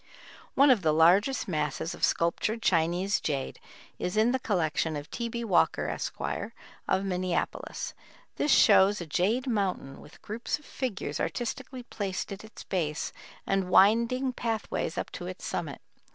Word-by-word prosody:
One 280 +1 +6
of 235 -6 +4
the 155 -3 +2
largest 195 - +4
masses 165 -1 -2
of - - -10
sculptured 215 +7 +1
Chinese 180 +3 +2
jade 140 -3 -3 0.4
is 180 +4 -2
in 220 +3 +4
the 260 - 0
collection 165 -7 0
of 145 0 -7
T. 235 0 -3
B. 235 0 -4
Walker, 195 -6 +2
Esq., - - -4 0.7
of 190 - +1
Minneapolis. 180 -2 -2 0.4
This 295 - 0
shows 200 -3 +6
a 170 - -5
jade 205 - +1
mountain, 195 - -2
with 150 - -15
groups 225 +6 -3
of 295 - -20
figures 210 - -4
artistically 245 +2 -4
placed 200 -5 -4
at 195 +1 -7
its 220 0 -11
base, 160 -5 -2 0.3
and 195 -2 0
winding 235 +7 +4
pathways 225 -3 -2
up - - -3
to - - -6
its - - -7
summit. - - -4
195 Hz, 150 wpm, -28 LUFS, 175-235 Hz, 0.7 s, One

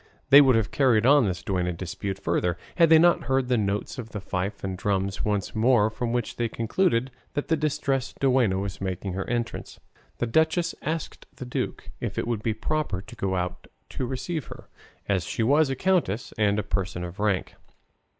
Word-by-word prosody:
They 140 +1 +11
would 130 -3 +5
have 110 -2 +1
carried 120 -5 +3
on 140 -1 +6
this 90 -3 -3
duenna 90 -2 -1
dispute 95 +3 -5
further 85 -1 0 0.2
had 165 -2 +6
they 160 - +8
not 175 +2 +4
heard 135 -1 +1
the 125 - +3
notes 105 +5 -2
of 115 -2 -6
the 105 - -5
fife 100 +1 -4
and 95 -1 -2
drums 95 0 -1
once 105 -2 -1
more, 110 -1 +3
from 115 +1 -3
which 120 -1 -2
they 120 -1 0
concluded 120 - 0 0.2
that 145 - -2
the 165 - +4
Distressed 135 -3 -1
Duenna 125 -8 +3
was 95 -1 -4
making 95 0 -3
her 95 +1 -4
entrance. 120 -1 -3 0.4
The - - 0
duchess 160 +7 +2
asked 160 +1 -4
the 130 - -7
duke 125 - -4
if - - -4
it - - 0
would 115 -3 -1
be 110 -1 -1
proper 150 -4 -2
to - - -12
go 95 -1 -1
out 90 0 -3 0.2
to 130 - -3
receive 140 +3 -3
her, - - -11 0.4
as 95 -3 +1
she 115 - -2
was 145 +5 +4
a 135 - -1
countess 165 - 0
and 105 -1 +2
a 105 - 0
person 95 -3 -2
of 90 +2 -7
rank. 100 -3 0
110 Hz, 200 wpm, -26 LUFS, 95-135 Hz, 0.4 s, They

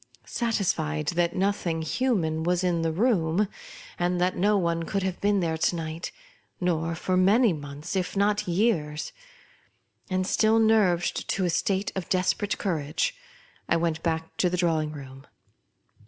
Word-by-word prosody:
Satisfied 160 - -1
that 175 0 0
nothing 185 -4 0
hu 255 +10 +1
man 160 -4 -1
was 175 +2 +1
in 175 -2 +1
the 165 0 0
room, 190 -1 +2 0.5
and 175 0 +1
that 180 +1 +1
no 205 +3 +3
one 170 -3 0
could 195 +3 -2
have 190 -1 -3
been 205 -1 +2
thereto 160 +1 0
night, 160 +1 -5 0.5
nor 165 -2 0
for 185 +3 -1
many 200 +4 +4
months, 145 +3 -6
if 190 +1 -2
not 205 +1 +1
years, 170 -6 0 1.0
and 185 0 0
still 220 +3 +3
nerved 210 -6 +2
to 190 - 0
a 175 - +1
state 195 +3 0
of 190 -3 -4
des 180 -1 +2
perate 205 0 -2
courage, 165 - -1 0.5
I - - +4
went 165 -1 -1
back 160 -1 -2
to 180 - +2
the 180 - -1
drawing 160 -3 +1
room. 135 -2 -10
175 Hz, 155 wpm, -26 LUFS, 160-200 Hz, 1.0 s, many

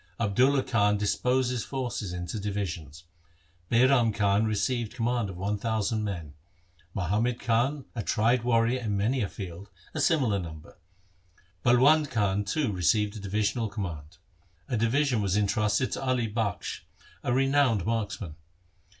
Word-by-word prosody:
Abdulla 130 +6 +3
Khan 105 -3 +2
disposed 125 +5 +1
his 125 -3 -2
forces 125 -7 -4
into 90 +4 -4
divisions. 90 -6 -4 0.7
Bairam 120 -1 +4
Khan 100 0 +2
received 115 +2 -1
command 120 -3 0
of 90 - -8
one 100 +3 -2
thousand 110 0 -1
men; 85 -8 -5 0.6
Muhammad 105 +7 0
Khan 125 +5 0
a 115 - -3
tried 115 +4 +2
warrior 120 +1 +2
in 105 -4 -2
many 120 +6 +1
a 100 - -1
field, 95 0 -8 0.2
a 155 - -2
similar 130 -11 +2
number; 80 -1 -9 0.8
Balwand 140 +5 +5
Khan 105 -2 +1
too 125 +4 -1
received 100 +3 +1
a - - -6
divisional 105 +3 -1
command. 85 -6 -6 0.5
A 125 - -1
division 120 +2 +2
was 100 0 +1
entrusted 105 +3 +1
to - - -3
Ali 130 -3 +1
Bakhsh, 110 -2 -2 0.4
a - - -1
renowned 135 -5 +2
marksman. 105 -7 -3
110 Hz, 140 wpm, -28 LUFS, 100-125 Hz, 0.8 s, Balwand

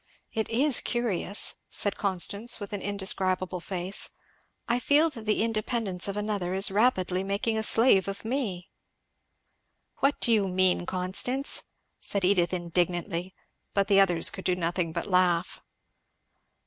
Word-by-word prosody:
It 220 -1 -2
is 260 +4 +3
curious!" 215 -4 0 0.2
said 205 - -1
Constance 200 +4 0
with 205 0 -7
an 205 - -3
indescribable 190 -2 0
face, 185 +1 -3 0.6
"I 240 +1 +1
feel 295 +6 +3
that 230 -6 -10
the 215 0 +2
independence 215 -4 -2
of 200 0 -4
another 205 -3 -2
is 195 +1 +3
rapidly 190 -4 +1
making 200 +3 -1
a 220 - 0
slave 220 -3 +4
of 195 +2 -6
me! 220 -8 -3 0.6
" - - -49
"What 280 +1 +1
do 235 - +4
you 205 -3 +2
mean, 185 -1 +2
Constance?" 190 +9 -1 0.4
said 200 -2 -2
Edith 180 -3 +2
indignantly. 175 +1 -2 0.4
But 200 0 +1
the 195 -1 +5
others 175 -4 +5
could 195 -3 -9
do 180 - +1
nothing 175 -1 -2
but - - -4
laugh. 180 -2 +1
195 Hz, 145 wpm, -27 LUFS, 180-220 Hz, 0.6 s, the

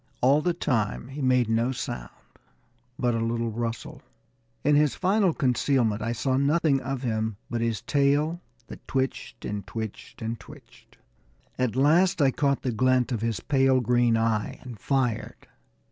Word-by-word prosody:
All 140 +4 +4
the 175 +1 0
time 125 - -1
he 140 +2 -6
made 125 -2 +3
no 115 +3 +1
sound - - -5 0.9
but 120 -1 +1
a 115 - 0
little 115 0 -1
rustle. 120 +6 -5 0.6
In 145 +1 +4
his 150 -1 +3
final 190 0 +2
concealment 125 -5 +1
I 115 +2 -1
saw 130 +3 0
nothing 140 0 +2
of 135 0 -4
him 110 -3 -1
but 120 -1 -1
his 115 -2 -1
tail, 145 +4 +1 0.2
that - - -12
twitched 135 0 -3
and 100 -2 -4
twitched 110 +1 -7
and 115 +1 -3
twitched. - - -16 0.6
At 125 -3 0
last 170 +8 +4
I 140 -3 +4
caught 140 0 0
the 125 - 0
glint 130 +2 +2
of 115 -4 -2
his 115 -2 -2
pale 135 -2 +3
green 120 -1 +2
eye 110 -2 0
and 120 -5 -9
fired. 125 -4 -1
125 Hz, 160 wpm, -26 LUFS, 115-140 Hz, 0.9 s, All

